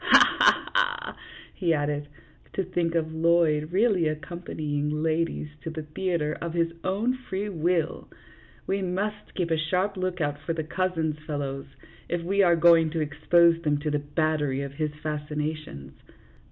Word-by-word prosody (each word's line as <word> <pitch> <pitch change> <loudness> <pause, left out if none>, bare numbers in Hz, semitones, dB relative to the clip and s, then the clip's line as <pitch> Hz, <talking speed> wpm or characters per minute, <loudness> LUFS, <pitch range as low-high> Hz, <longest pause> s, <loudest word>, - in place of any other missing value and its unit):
Ha! - - +6
ha! - - +4
ha! - - 0 0.2
" - - -18
he 170 -4 +1
added. 145 0 -1 0.2
" - - -29
To 195 - 0
think 175 -2 -1
of 160 -1 0
Lloyd 160 -2 +2
really 195 -4 +3
accompanying 155 -1 -3
ladies 160 -1 0
to - - -5
the 160 -1 -5
theatre 155 -1 -1
of 170 0 -4
his 165 -1 +1
own 210 +7 +1
free 210 -6 -4
will! 170 -2 -1 0.6
We 195 +1 -1
must 200 +3 -3
keep 175 -3 -1
a 160 - +3
sharp 185 +6 0
lookout 175 -6 -1
for 155 +2 -3
the 160 -1 -2
cousins, 160 -2 -1
fellows, 140 -2 -3 0.4
if 170 -1 -1
we 200 +3 +2
are 175 -3 +5
going 165 -1 +6
to 165 +1 -2
expose 165 +3 +3
them 150 -3 +1
to 150 0 -1
the 150 - +1
battery 145 -2 0
of 140 - -5
his 155 +1 -1
fascina 150 0 -2
tions. 70 - -10
165 Hz, 165 wpm, -26 LUFS, 150-180 Hz, 0.6 s, Ha